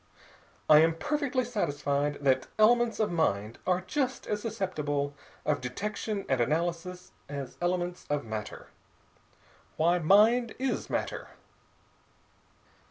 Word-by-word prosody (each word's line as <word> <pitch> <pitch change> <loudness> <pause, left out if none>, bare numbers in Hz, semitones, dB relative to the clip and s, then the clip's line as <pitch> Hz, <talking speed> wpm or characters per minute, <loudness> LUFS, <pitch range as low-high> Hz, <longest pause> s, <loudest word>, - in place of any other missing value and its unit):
"I 150 -1 +8
am 165 +1 +4
perfectly 270 - -1
satisfied 145 -9 -1
that 130 -2 +2
elements 230 +1 +4
of 215 - +1
mind 110 - 0
are 180 0 +2
just 260 +6 -2
as 210 0 -2
susceptible 150 -10 -2 0.3
of 145 -3 +1
detection 200 - -3
and 130 -2 +1
analysis 170 +6 -2 0.2
as 140 -3 -6
elements 175 0 -1
of 145 -1 -1
matter. 110 -2 -6 1.1
Why, 170 +3 +3
mind 220 +8 +4
is 265 +1 -2
matter. - - -3
175 Hz, 110 wpm, -29 LUFS, 145-215 Hz, 1.1 s, I